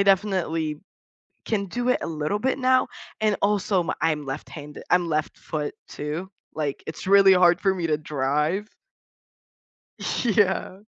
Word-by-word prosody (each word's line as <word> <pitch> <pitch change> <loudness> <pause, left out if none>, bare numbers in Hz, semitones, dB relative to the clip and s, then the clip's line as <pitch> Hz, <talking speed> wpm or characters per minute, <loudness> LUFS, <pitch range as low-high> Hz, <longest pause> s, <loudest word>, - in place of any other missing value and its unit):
I - - +6
definitely, 180 -6 +1 0.7
can 200 -3 0
do 245 +6 -2
it - - +4
a - - -2
little 155 +5 -1
bit 265 +3 0
now, 255 0 +4 0.4
and 215 -1 +3
also, 200 -3 +1
I'm 155 -2 +1
left 135 0 -5
hande 150 -1 -9
I'm 180 -1 +4
left 155 -1 -1
foot 150 -2 -4
too, 155 +6 -5 0.3
like, 145 -3 -3
it's 160 - -6
really 195 -1 +7
hard 175 -1 +5
for 195 -1 +3
me 170 -3 -2
to 150 - +1
drive. 150 +7 -1 1.6
Yeah. 195 -3 +1
180 Hz, 150 wpm, -25 LUFS, 155-200 Hz, 1.6 s, really